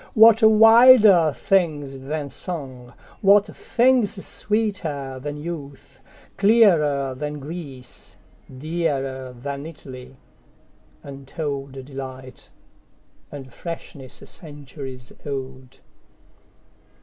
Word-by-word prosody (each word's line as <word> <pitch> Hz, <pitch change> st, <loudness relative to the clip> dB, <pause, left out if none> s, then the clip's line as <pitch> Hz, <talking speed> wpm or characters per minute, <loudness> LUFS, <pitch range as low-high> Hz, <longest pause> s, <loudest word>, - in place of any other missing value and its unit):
What 225 Hz, +1 st, +7 dB
wilder 220 Hz, -5 st, +7 dB
things 145 Hz, -7 st, -1 dB
than 145 Hz, +2 st, -5 dB
song, 130 Hz, -5 st, -8 dB, 0.3 s
what 200 Hz, +1 st, +5 dB
thingsSweeter 210 Hz, -, -1 dB
than 145 Hz, +1 st, -6 dB
youth, 150 Hz, -3 st, -9 dB, 0.4 s
clearer 165 Hz, -, +3 dB
than 150 Hz, +3 st, -5 dB
Greece, 140 Hz, -4 st, -10 dB, 0.3 s
Dearer 135 Hz, -3 st, -3 dB
than 140 Hz, +4 st, -7 dB
Italy, 130 Hz, -5 st, -12 dB, 0.9 s
untoldDelight, 135 Hz, -2 st, -8 dB, 0.8 s
and 135 Hz, -3 st, -10 dB
freshness 150 Hz, -6 st, -9 dB
centuries 140 Hz, -5 st, -11 dB
old? 130 Hz, -2 st, -7 dB
145 Hz, 70 wpm, -22 LUFS, 135-175 Hz, 0.9 s, What